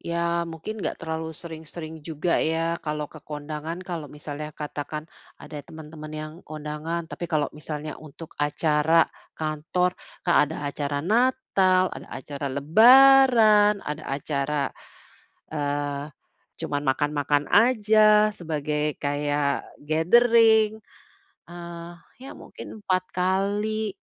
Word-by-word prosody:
ya 170 0 -1
mungkin 180 +7 -7
nggak - - -3
terlalu 160 0 -4
sering-sering 160 -1 -8
juga, 160 +2 -1
ya, 165 +1 0
kalau 150 -1 -3
ke 155 +1 -12
kondangan. 150 +2 -6
Kalau 165 -5 -5
misalnya 150 +1 -7
katakan 150 +1 -5 0.3
ada 150 -2 -9
temen-temen 155 -1 -10
yang 155 0 -7
kondangan. 155 +2 -5
Tapi 175 +1 -7
kalau 150 -3 0
misalnya 150 0 -6
untuk 155 +1 -11
acara 150 +2 +3 0.3
kantor, 160 +4 -1 0.3
Kak, 175 - +3
ada 160 - -6 0.2
acara 145 -1 -2
natal, 195 -5 +2
ada - - -9
acara 140 +1 -6
lebaran, 220 - +6
ada 150 - -5
acara, 140 +1 -2 0.8
eee, 145 -1 -2 0.6
cuman 145 0 -2
makan-makan 145 +1 +1
aja 215 -1 +5
sebagai 150 -4 -2
kayak 145 0 -1
gathering 220 +6 +4 0.7
ah, 170 0 -9 0.2
ya, 270 - -9
mungkin - - -10
4 185 -1 +1
kali. 200 +3 0
160 Hz, 110 wpm, -25 LUFS, 150-185 Hz, 0.8 s, lebaran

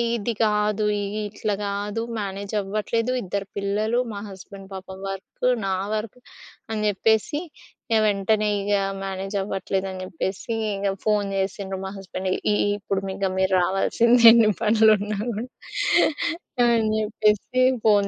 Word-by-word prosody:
ఇది 230 +1 -2
గాదు. 210 0 +2 0.2
ఇగ 200 +1 -4
ఇట్లా 210 0 -2
గాదు. 205 +2 -2 0.2
మేనేజ్ 200 0 -5
అవ్వట్లేదు, 215 +4 -1
ఇద్దరు 200 +1 -4
పిల్లలు, 210 +4 0
మా 200 - -5
హస్బెండ్ 195 0 -11
పాపం 190 0 -8
వర్క్, 195 +5 -6 0.2
నా 190 - 0 0.2
వర్క్ 215 +2 -3 0.5
అని 215 -1 -2
జేప్పేసి 220 +7 +1 0.5
ఇగ 220 - +5
వెంటనే 210 +1 +1
ఇగ 205 +1 -1 0.3
మేనేజ్ 195 +1 -4
అవ్వట్లేదని 190 -1 -3
జెప్పేసి 190 +6 -4 0.2
ఇంగ 200 0 -2 0.2
ఫోన్ 205 -2 +2
జేసిండ్రు 195 0 -2
మా - - -3
హస్బెండ్‌. 185 0 -5 0.2
"ఇ - - +3 0.2
ఇప్పుడు 195 -1 -2 0.2
ఇగ 195 -1 0
మీరు 190 0 +2
రావాల్సిందె 230 +6 +3
ఎన్ని 225 -2 +6
పనులు 220 0 +5
ఉన్నా 205 +1 -3
గూడా" 225 +2 -3 1.2
అని - - +4
అని 220 -2 +2
చెప్పేసి 215 +3 +1 0.2
ఫోన్ 205 -2 +5
205 Hz, 135 wpm, -24 LUFS, 195-215 Hz, 1.2 s, ఎన్ని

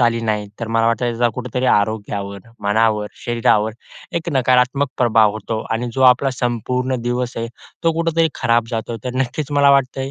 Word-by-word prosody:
आली 115 -1 +2
नाही. 105 -2 -1
तर 115 - -3
मला 115 0 +2
वाटतं 115 +1 +1
त्याचा 120 0 +1
कुठेतरी 125 +1 -2
आरोग्यावर, 100 -2 0 0.2
मनावर, 105 +1 +1 0.2
शरीरावर 110 -2 +2 0.4
एक 170 0 -3
नकारात्मक 130 +1 +2
प्रभाव 110 -4 +4
होतो. 110 +1 -4
आणि 115 +2 -1
जो 130 - 0
आपला 130 +1 +5
संपूर्ण 125 +1 -2
दिवस 120 +1 -2
आहे, 115 0 -3 0.4
तो 165 - +4
कुठेतरी 165 0 +1
खराब 115 -1 +2
जातो. 115 0 -3
तर 125 0 -4
नक्कीच 135 +3 -2
मला 140 -1 +5
वाटतं 135 -1 +2
आहे 135 +1 -3
120 Hz, 170 wpm, -19 LUFS, 110-130 Hz, 0.4 s, आपला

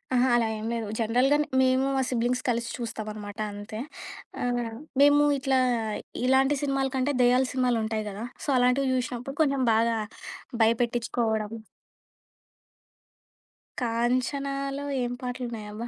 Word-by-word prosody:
ఆహా! 250 +1 +4
అలా 235 -1 +3
ఏం 215 - -6
లేదు 230 -2 -2
జనరల్‌గా 250 +6 +3
న్ - - -7 0.2
మేము 260 +1 +3
మా 265 - +2
సిబ్లింగ్స్ 250 +1 0
కలిసి 235 0 0
చూస్తాం 225 -3 -5
అనమాట 205 0 -8
అంతే. 205 +1 -7 0.6
ఆ! - - -1 0.6
మేము 290 +1 +6
ఇట్లా 265 0 +1 0.2
ఆహ్, 220 -2 -2 0.3
ఇలాంటి 265 +2 +4
సినిమాల 275 -1 +1
కంటే, 265 +2 +1
దెయ్యాల 250 +1 +4
సినిమాలుంటాయి 225 -4 0
గదా! 205 +3 -6 0.2
సో - - -3
అలాంటివి 250 +2 +3
చూసినప్పుడు 250 +2 -3
కొంచెం 275 -3 +2
బాగా 230 0 +2 0.6
భయపెట్టిచ్చుకోవడం. 230 -1 +1 2.3
'కాంచనాలో' 275 +4 -1 0.2
ఏం 245 0 -1
పాటలు 250 0 -4
ఉన్నాయబ్బా? 215 +1 -6
245 Hz, 125 wpm, -27 LUFS, 225-265 Hz, 2.3 s, మేము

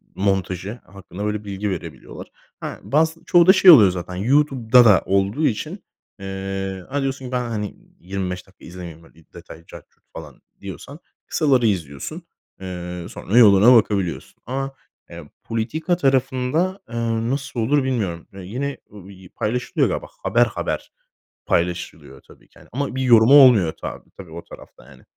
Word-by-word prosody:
montajı 95 +2 -2
hakkında 95 +1 -9
böyle 105 0 -3
bilgi 100 +1 -4
verebiliyorlar. 85 -7 -8 0.3
Ha, - - -7
bazısı 160 +3 0
çoğu 175 0 +4
da 190 - +9
şey 190 -2 +8
oluyor 105 - +8
zaten, 90 0 -6
YouTube'da 125 +1 +3
da 105 -4 +6
olduğu 100 +10 0
için, 155 - -4 0.4
ııı, 95 -1 -5
ha, 140 +1 -2
diyorsun 135 -1 -3
ki: 125 - -8
"Ben, 125 -2 -2
hani, 105 -2 -4 0.2
25 90 0 -5
dakika 95 - -19
izlemeyeyim 85 -2 -10
böyle 80 -1 -21
detay 85 0 -13
cart - - -13
curt - - -40
falan." - - -11 0.2
diyorsan 120 - -9 0.3
kısaları 135 -6 +1
izliyorsun. 85 - -4 0.4
Iıı, 90 -2 -7
sonra 110 +6 -2
yoluna 110 +1 +7
bakabiliyorsun 100 -7 -1
ama, 135 +2 -4 0.3
eee, 85 -3 -11
politika 155 +10 -2
tarafında, 135 +6 0
ııı, 115 -1 -2
nasıl 135 -3 -4
olur 135 +5 +1
bilmiyorum. 100 -11 -3
Ya, 95 - -10
yine, 135 +9 -4 0.2
ııı, 100 -1 -12
y 95 -2 -15
paylaşılıyor 120 +3 -1
galiba. - - -4 0.2
Haber, - - +3
haber - - -5 0.6
paylaşılıyor 85 0 -3
tabii - - -21
ki, - - -22
hani, - - -19
ama 135 0 -3
bir 130 - -1
yorumu 120 +1 +6
olmuyor 120 - +7
tabii - - -8
tabii, 90 -4 -12
o 85 +1 -9
tarafta, - - -15
yani. - - -18
105 Hz, 155 wpm, -21 LUFS, 95-130 Hz, 0.6 s, da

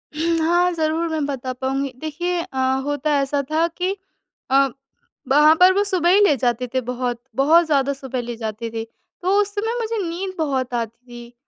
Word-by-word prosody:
हुँ, 330 +2 +1
हाँ, 350 +1 +3
ज़रूर 320 +1 0
मैं 315 -2 -1
बता 260 -2 -4
पाऊँगी 270 +1 -2
देखिए 345 +3 -2
अ, 270 - -9 0.3
होता 290 +1 -1
ऐसा 280 +1 0
था 325 +2 +2
कि 360 +3 -2 0.6
अ, 275 0 +5 0.6
वहाँ 300 +3 +6
पर 365 +1 +7
वो 405 - +2
सुबह 370 -4 +1
ही 385 +3 +6
ले 295 - +4
जाते 245 +1 0
थे, 260 - +1
बहुत-बहुत 250 +6 +1
ज़्यादा 280 -3 +1
सुबह 265 -2 -5
ले 240 0 -6
जाते 225 0 -5
थे, 225 - -3 0.4
तो 370 +2 +1
उस 405 0 -3
समय 445 +3 -1
मुझे 455 0 -2
नींद 370 +3 -4
बहुत 265 -5 -1
आती 230 +1 -4
थी। 240 0 -11
290 Hz, 185 wpm, -21 LUFS, 255-340 Hz, 0.6 s, पर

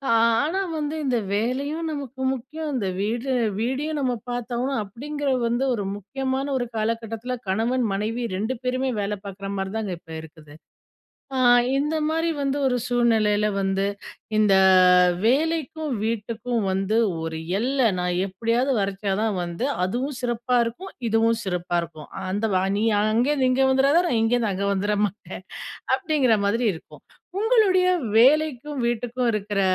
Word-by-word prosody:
ஆனா 230 +11 +2 0.2
வந்து 305 +1 -2
இந்த 250 -3 +1 0.2
வேலையும் 280 +9 -1
நமக்கு 275 -3 -6
முக்கியம். 300 +5 -5
இந்த 200 -7 -1
வீடு 235 +5 -1 0.3
வீடையும் 285 +6 -1
நம்ம 250 -2 0 0.2
பாத்தாகணும். 245 +1 -2
அப்டிங்கற 285 +7 -4 0.2
வந்து 240 +3 0
ஒரு 205 -3 -3
முக்கியமான 260 +7 -3
ஒரு 245 -1 -2
காலகட்டத்துல 225 +2 -2
கணவன், 230 +5 +1
மனைவி 220 +4 -2
2 220 +6 -2
பேருமே 255 +1 0
வேலை 205 +1 -2
பாக்குற 195 0 -7
மாரி 190 +1 -3
தாங்க 210 -4 -3
இப்ப 165 - -15
இருக்குது. 155 -2 -14 0.8
அ - - 0 0.4
இந்த 300 +3 0
மாரி 325 +2 0
வந்து 275 0 0
ஒரு 250 -1 +2
சூழ்நிலையில 220 -4 +2
வந்து 195 0 0 0.5
இந்த 210 -2 +4 0.7
வேலைக்கும் 315 +3 0
வீட்டுக்கும் 230 +1 -2
வந்து 195 +3 0 0.3
ஒரு 160 0 -4 0.2
எல்ல 260 +5 -1 0.2
நான் 180 0 -1
எப்டியாவது 230 +7 0
வரச்சா 195 0 -2
தான் 220 -3 0
வந்து 175 +6 -4 0.2
அதுவும் 250 +9 -2
சிறப்பா 245 0 0
இருக்கும். 240 +12 -6 0.2
இதுவும் 225 +1 +2
சிறப்பா 180 -2 -2
இருக்கும். 160 -2 -9 0.2
அந்த 205 +4 -1
வா 185 - +3
நீ 210 - 0 0.2
அங்கருந்து 250 +6 +2
இங்க 265 +1 +3
வந்துறாத, 270 +3 +3
நான் 240 -9 +1
இங்கருந்து 225 -1 +2
அங்க 195 +1 -2
வந்துர 205 +2 0
மாட்டேன், 205 +2 -9 0.5
அப்டிங்கற 300 - +2
மாதிரி 230 +4 +1
இருக்கும். 160 - -13 0.4
உங்களுடைய 405 -6 +4 0.3
வேலைக்கும் 290 +1 +3
வீட்டுக்கும் 240 +1 -1
இருக்குற 205 -1 -1
235 Hz, 140 wpm, -24 LUFS, 210-270 Hz, 0.8 s, இந்த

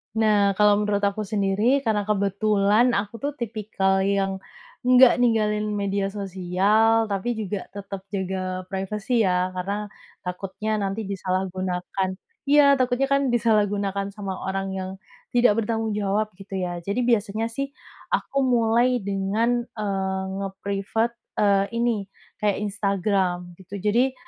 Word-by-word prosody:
Nah, 210 -3 +3
kalau 210 0 +4
menurut 205 -1 0
aku 200 +1 0
sendiri, 210 +7 +1
karena 210 -3 0
kebetulan 210 +3 +2
aku 205 +3 -3
tuh, 285 +1 -2
tipikal 210 -5 -1
yang 195 0 0 0.5
nggak 255 0 +7
ninggalin 215 -3 +2
media 200 -1 -1
sosial, 200 +3 +2
tapi 210 +5 -1
juga 205 -2 -4
tetep 200 -1 -6 0.2
jaga 185 -1 -3
privasi 210 +3 0
ya, 180 0 +1
karena, 200 +3 -4 0.3
takutnya 190 +4 -4
nanti 200 +2 -2
disalahgunakan 185 -1 -2 0.4
iya, 285 -1 +6
takutnya 255 +1 +1
kan 275 0 +3
disalahgunakan 205 -4 +1
sama 195 -3 -5
orang 195 0 -2
yang 185 0 -4 0.5
tidak 240 -3 +4
bertanggung 225 0 -1
jawab, 205 +2 0
gitu 195 0 -11
ya. 175 -1 -3
Jadi 200 +8 -2
biasanya 225 -1 +1
sih, 275 +4 -2 0.5
aku 275 - -1
mulai 240 0 +3
dengan, 210 +5 0
eee, 195 -3 -2 0.2
nge-privat, 200 +3 -2 0.3
eee, 200 -1 +4
ini, 230 -4 0 0.3
kayak 210 -2 +1
Instagram, 195 -3 0
gitu. 190 +1 -8
Jadi, 240 +5 +2
205 Hz, 125 wpm, -24 LUFS, 195-225 Hz, 0.5 s, nggak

